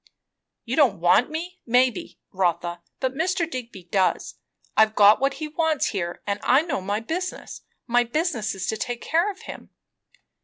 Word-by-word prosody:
"You 245 +2 -2
don't 250 - +3
want 180 - +4
me, 345 +4 -6
maybe, 250 -1 +1
Rotha, 175 -2 -1 0.2
but 260 -1 -1
Mr. 335 +3 0
Digby 240 - -7
does. 185 +1 0 0.4
I've 220 0 +4
got 205 +1 +7
what 275 +1 +1
he 310 - -5
wants 315 -1 0
here, 175 -3 -4
and 200 0 -2
I 265 +5 +4
knows 295 - -2
my 205 +2 0
business. 360 +9 -5 0.2
My 245 0 +3
business 240 - -1
is 190 -1 -4
to 220 - -2
take 240 +1 -4
care 340 +6 +2
of 390 -1 -8
him." - - -10
245 Hz, 165 wpm, -24 LUFS, 200-315 Hz, 0.4 s, got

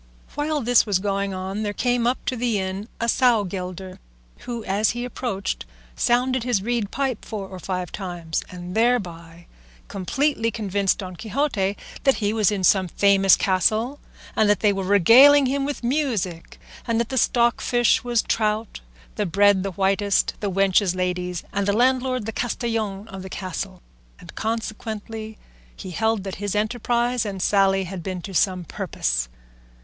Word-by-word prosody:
While 295 +1 -1
this 245 -1 +4
was 200 -3 +2
going 200 0 -1
on 190 +2 -4
there 205 -1 -2
came 245 +1 +1
up 250 - -1
to 255 - -1
the 235 -2 0
inn 190 +2 -3
a 235 - 0
sowgelder, 190 -7 0 0.4
who, 235 -2 -6
as 205 +2 +1
he 240 - -2
approached, 195 - -3 0.3
sounded 255 +1 +1
his 240 -6 0
reed 235 -3 -1
pipe 265 -3 -2
four 205 -3 -6
or 185 -1 -9
five 180 -1 -4
times, 175 -4 -4
and 180 0 -8
thereby 175 -8 -1 0.4
completely 230 - 0
convinced 200 -4 0
Don 185 -2 -7
Quixote 210 - -1 0.3
that 270 -2 +4
he 210 -1 -1
was 215 -3 +2
in 200 -2 -2
some 185 0 +4
famous 195 +2 +4
castle, 215 - +1 0.4
and 215 -1 +3
that 205 - +2
they 210 -2 +4
were 195 0 -3
regaling 250 - +7
him 275 +1 0
with 285 -3 -4
music, 235 - -2 0.3
and 230 -1 +1
that 235 - -1
the 265 - -3
stockfish 240 0 +2
was 240 -2 +1
trout, 215 0 -1 0.4
the 210 - 0
bread 200 +2 +4
the 195 - -2
whitest, 195 +2 +1
the 205 - -2
wenches 195 0 +2
ladies, 180 -1 -2
and 200 0 -1
the 200 - +2
landlord 255 0 +1
the 225 - -3
castellan 225 -4 -2
of 190 -1 -8
the 190 - -8
castle; 185 0 -6 0.4
and 175 -2 -12
consequently 220 0 -5 0.4
he 185 - -8
held 220 +2 0
that 195 -1 -6
his 205 0 -2
enterprise 240 +2 0
and 200 -3 -5
sally 195 0 +3
had 185 0 -6
been 180 0 -5
to 195 - -7
some 185 0 +1
purpose. - - -2
205 Hz, 165 wpm, -23 LUFS, 190-235 Hz, 0.4 s, regaling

